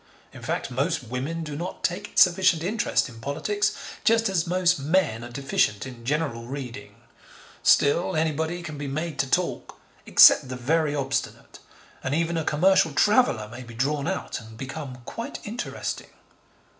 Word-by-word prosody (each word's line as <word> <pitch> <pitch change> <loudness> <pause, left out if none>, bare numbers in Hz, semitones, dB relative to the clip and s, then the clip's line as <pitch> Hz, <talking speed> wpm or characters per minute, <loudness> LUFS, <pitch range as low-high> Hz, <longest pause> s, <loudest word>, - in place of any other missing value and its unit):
In - - -11
fact, - - -3
most - - -1
women 140 +8 -4
do 150 -2 -6
not 170 +5 -6
take 190 +4 -2
sufficient 180 -3 +5
interest 215 +6 0
in 115 -3 -12
politics, 405 - -1 0.3
just 225 -1 +3
as 175 -4 0
most 180 -1 +2
men 140 -7 +1
are 120 - -8
deficient 120 -5 0
in 125 -3 -10
general 140 -4 -1
reading. 130 -2 -7 0.7
Still, 145 +5 +3
anybody 160 +2 -1
can 155 -4 -7
be 145 - -4
made 155 +3 -4
to 135 - 0
talk, 180 +5 -1 0.3
except 130 - +7
the 130 - -4
very 150 +4 0
obstinate, 135 -1 -3 0.4
and 135 +2 -1
even 170 +1 0
a 160 - 0
commercial 165 +1 +3
traveller 210 - +3
may 120 +3 -9
be 115 -2 -11
drawn 140 +4 -1
out - - -3
and 110 0 -13
become 135 -1 -7
quite 230 - -6
interesting. 230 +4 -5
150 Hz, 155 wpm, -25 LUFS, 130-175 Hz, 0.7 s, except